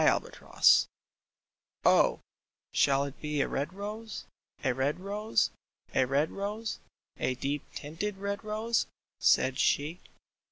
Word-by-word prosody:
THREE - - +3
ROSES - - +5 0.5
" - - -37
Oh, - - +5 0.5
shall 140 0 +3
it 140 0 -7
be 150 -1 -2
a - - +1
red 140 +5 -2
rose, 210 +3 -6 0.4
a 130 -3 +2
red 135 +6 0
rose, 205 +3 0 0.4
a 130 - +4
red 140 +4 +1
rose, 210 +3 -3 0.4
A 130 - 0
deep 140 +3 -3
tinted 180 +7 -4
red 200 +1 -3
rose? 215 +2 0 0.2
" - - -64
said 130 0 +3
she. 155 +5 +2
170 Hz, 135 wpm, -30 LUFS, 140-210 Hz, 0.5 s, ROSES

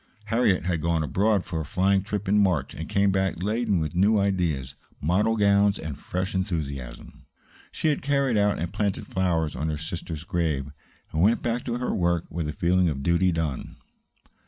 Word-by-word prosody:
Harriet 105 -7 +2
had 85 -3 0
gone 85 0 +1
abroad 100 +5 +1
for 85 -2 -3
a - - -3
flying 95 +4 +2
trip 105 0 -4
in 105 +2 +3
March 90 -9 +1
and 80 +3 -7
came 100 0 +3
back 95 -2 -1
laden 105 -2 +1
with 75 -2 -2
new 100 +4 +4
ideas, 85 -10 0 0.3
model 105 +8 +1
gowns, 100 0 +4
and 80 -3 -6
fresh 90 +2 -3
enthusiasm. 75 -9 -4 0.5
She 155 -2 +1
carried 140 -3 +1
out 105 -1 +2
and 85 +1 -4
planted 100 -2 -1
flowers 85 -5 0
on 75 +5 -2
her 75 - -2
sister's 80 0 -5
grave, 80 -7 -1 0.4
and 80 - +1
went 110 +6 +3
back 120 +1 -1
to 120 -1 -2
her 125 - -2
work 85 -2 +1
with 80 -1 -3
a - - -1
feeling 90 +2 +2
of 70 -3 -4
duty 85 +3 +3
done. 80 -5 -3
90 Hz, 180 wpm, -25 LUFS, 80-100 Hz, 0.5 s, new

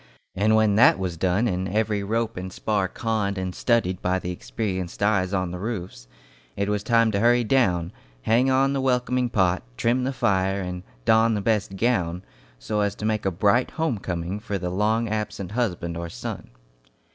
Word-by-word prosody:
And 105 +3 +2
when 110 -2 +3
that 120 - +6
was 95 -3 -3
done 95 +7 +1
and 95 -2 -2
every 105 +1 0
rope 115 +3 -1
and 95 +1 -6
spar 100 0 -1
conned 105 -1 -2
and 95 -1 -3
studied 95 -7 +1
by 90 +1 +1
the 90 -1 -4
experienced 95 0 -4
eyes 95 -3 +2
on 95 -3 -1
the 90 - -5
roofs, 90 - -5 0.5
it 100 - -1
was 105 -1 0
time 115 0 +3
to 100 - 0
hurry 120 +2 +4
down, 95 -9 +1 0.3
hang 120 +4 +3
on 135 +1 +3
the 135 - 0
welcoming 125 -1 +1
pot, 95 -5 +2 0.2
trim 120 +2 +1
the 130 - 0
fire 95 -5 +1
and 90 -1 -4 0.2
don 110 0 +4
the - - 0
best 100 -2 0
gown, 95 -6 0 0.3
so - - -3
as 100 0 0
to 105 - -5
make 110 -2 0
a - - +1
bright 100 +7 +2
home 160 -10 0
coming 90 +2 -4
for 105 -1 -3
the 90 -1 -4
long 110 +4 +1
absent 105 -3 -3
husband 90 -8 -2
or 85 0 -5
son. - - -7
100 Hz, 190 wpm, -24 LUFS, 95-115 Hz, 0.5 s, that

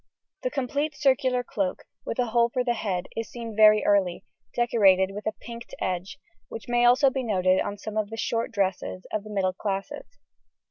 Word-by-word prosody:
The - - -1
complete 285 - -2
circular 260 -3 +2
cloak, 195 -6 -3 0.2
with - - -3
a 250 - +2
hole 235 +1 +2
for 250 +1 -1
the 240 -1 +1
head, 190 -5 -2
is 225 -1 -4
seen 230 -2 -7
very 215 0 +6
early, 195 -4 +2 0.3
decorated 195 -6 +4
with 210 +2 -6
a - - +2
pinked 235 0 -9
edge, 185 +4 -3 0.3
which 225 - -8
may 240 0 +2
also 265 +3 +5
be 265 - -2
noted 185 -5 +2
on 205 - -4
some 215 +1 -6
of 215 -1 0
the 225 - -7
short 230 +1 -1
dresses 190 -3 -2
of 215 - -1
the 215 - -11
middle 190 -3 0
classes. 195 - -5
220 Hz, 190 wpm, -26 LUFS, 195-240 Hz, 0.3 s, very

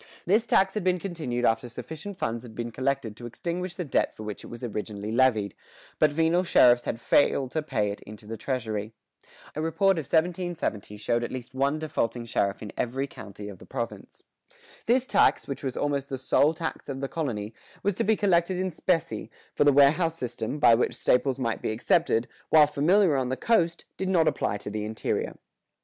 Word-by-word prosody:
This 215 +6 +3
tax 195 -2 +3
had 215 - -2
been 185 0 +2
continued 160 -10 -3
after 115 +2 +1
sufficient 160 - -8
funds 115 -9 -2
had 115 -3 -12
been 120 0 -4
collected 130 -3 -1
to 120 +1 -8
extinguish 175 +8 -4
the 180 - -4
debt 140 - 0
for 110 - -8
which 105 -2 -6
it - - -9
was 120 +1 -9
originally 105 -2 -4
levied, 110 -5 +2 0.5
but 155 -1 +5
venal 165 +4 +2
sheriffs 120 -8 +5
had 115 - -3
failed 135 +1 +2
to 155 - -1
pay 110 -9 -1
it 100 - -8
into 105 0 -12
the 115 +2 -5
treasury. 110 -3 -3 0.6
A 155 - -2
report 180 +3 +2
of 155 - -5
1770 165 - -1
showed 120 +3 0
at - - -4
least 130 0 -7
one 140 +3 +1
defaulting 120 -6 -2
sheriff 100 -3 -1
in 105 - -7
every 130 +3 -1
county 105 -6 -10
of 100 -3 -9
the - - -14
province.[118:2] 120 - -8 0.3
This 245 +2 +3
tax, - - +3
which 140 - -5
was 130 -3 -4
almost 140 -1 -1
the 135 - -3
sole 145 +4 +3
tax 160 -2 -5
of 135 -1 -4
the 135 - -2
colony, 120 -10 -3 0.3
was 205 - +2
to - - -1
be 220 +2 +3
collected 185 -3 +2
in 185 0 -1
specie, 165 0 -1 0.2
for - - +3
the 145 - +7
warehouse 155 +4 +4
system, 120 0 -4
by 145 -6 +6
which 115 - +1
staples 130 +1 +2
might 115 -4 -2
be - - -2
accepted, 115 +2 +2 0.2
while 155 -1 +7
familiar 160 +4 +3
on 130 -2 0
the 130 - -2
coast, 170 -7 +1
did 190 - -2
not 170 -4 +3
apply 100 - 0
to 105 0 -7
the 105 0 -3
interior. 110 +1 -2
135 Hz, 200 wpm, -27 LUFS, 115-165 Hz, 0.6 s, the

